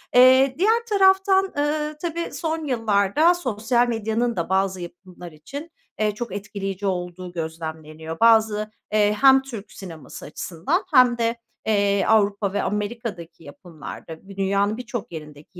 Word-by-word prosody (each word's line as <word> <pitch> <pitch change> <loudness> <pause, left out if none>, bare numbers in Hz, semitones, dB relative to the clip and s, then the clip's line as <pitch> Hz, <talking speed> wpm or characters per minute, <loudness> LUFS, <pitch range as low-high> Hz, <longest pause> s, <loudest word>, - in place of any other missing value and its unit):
Eee, 260 +1 +6
diğer 450 +6 +2
taraftan, 385 -1 +4
ııı, 300 +1 -1
tabii, 340 0 -3
son 320 -1 -3
yıllarda 225 - +2
sosyal 240 -6 0
medyanın 230 +1 -1
da 170 0 -3
bazı 190 -1 0
yapımlar 175 0 -10
için, 280 - -9 0.3
eee, 215 -1 +2
çok 240 -1 -5
etkileyici 200 -1 -5
olduğu 180 -1 -4
gözlemleniyor. 160 -1 -6
Bazı, 220 -2 +4 0.2
eee, 210 -1 +3
hem 270 -1 +7
Türk 235 -6 -9
sineması 165 -5 -10
açısından 180 - -2
hem 250 -3 +6
de, 230 0 0 0.3
eee, 200 -2 +2
Avrupa 205 -2 +2
ve 205 - 0
Amerika'daki 205 -6 -4
yapımlarda, 160 +2 -10
bir 195 - -11
dünyanın 200 +2 +1
birçok 240 -5 -6
yerindeki 150 +2 -11
210 Hz, 135 wpm, -23 LUFS, 180-255 Hz, 0.3 s, hem